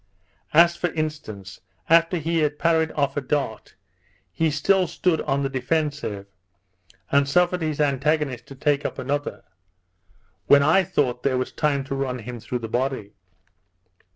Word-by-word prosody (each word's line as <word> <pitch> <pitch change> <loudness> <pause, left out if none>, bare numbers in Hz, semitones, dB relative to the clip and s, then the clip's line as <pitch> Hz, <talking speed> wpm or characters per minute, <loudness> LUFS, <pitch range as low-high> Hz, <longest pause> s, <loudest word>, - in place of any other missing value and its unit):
As 170 +2 +6
for 175 - -1
instance, 110 - -5 0.3
after 165 +2 +4
he 165 +1 -1
had 150 -1 0
parried 160 -1 +2
off 140 -1 -1
a - - +1
dart, 135 -4 -3 0.6
he 165 -1 +1
still 185 +5 +2
stood 170 -2 0
on 140 +1 -1
the - - +1
defensive, 135 -6 -2 0.9
and 140 0 +3
suffered 180 +3 +2
his 155 -2 -2
antagonist 145 -2 0
to 135 - -11
take 145 +1 +1
up - - -4
another, 145 +2 -3 1.0
when 140 0 +6
I 160 +6 +4
thought 135 -9 0
there 135 -2 +1
was 130 - -2
time 140 -2 0
to 135 - -5
run 135 -2 -2
him 120 +1 -7
through 115 +3 -4
the - - -4
body. 120 -3 -2
145 Hz, 155 wpm, -23 LUFS, 130-160 Hz, 1.0 s, As